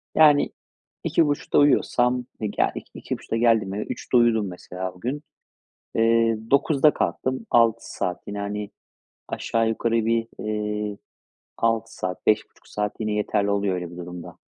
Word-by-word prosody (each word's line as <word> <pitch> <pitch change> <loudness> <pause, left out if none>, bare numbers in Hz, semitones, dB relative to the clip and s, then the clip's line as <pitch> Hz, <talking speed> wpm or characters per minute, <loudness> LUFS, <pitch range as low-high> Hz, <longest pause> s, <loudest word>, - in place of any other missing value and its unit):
Yani, 150 -2 +6 0.5
2.30'da 145 -3 +1
uyuyorsam 125 -3 +3
e 110 - -1
ga - - +1
2.00, - - -8
2.30'da 115 - -4
geldim 115 -4 +3
eve 105 - -2
3.00'te 125 - -1
uyudum 115 -3 +3
mesela 90 +1 -6
o 90 - -17
gün, 135 +8 -3 0.7
eee, 115 0 +3
9.00'da 145 +1 +4
kalktım. 130 +11 -2
6 115 -1 +3
saat 90 -1 -2
yine, 100 0 -4
hani, 100 0 -4 0.6
aşağı 115 -1 0
yukarı 115 0 0
bir, 115 0 +1 0.2
iii, 105 -1 -2 0.6
6 115 0 0
saat, 90 0 -5
5,5 105 - 0
saat 105 0 -3
yine 110 -1 -1
yeterli 105 -1 0
oluyor 100 -1 +1
öyle 90 -2 -4
bir 85 - -11
durumda. 90 0 -8
110 Hz, 145 wpm, -24 LUFS, 100-120 Hz, 0.7 s, Yani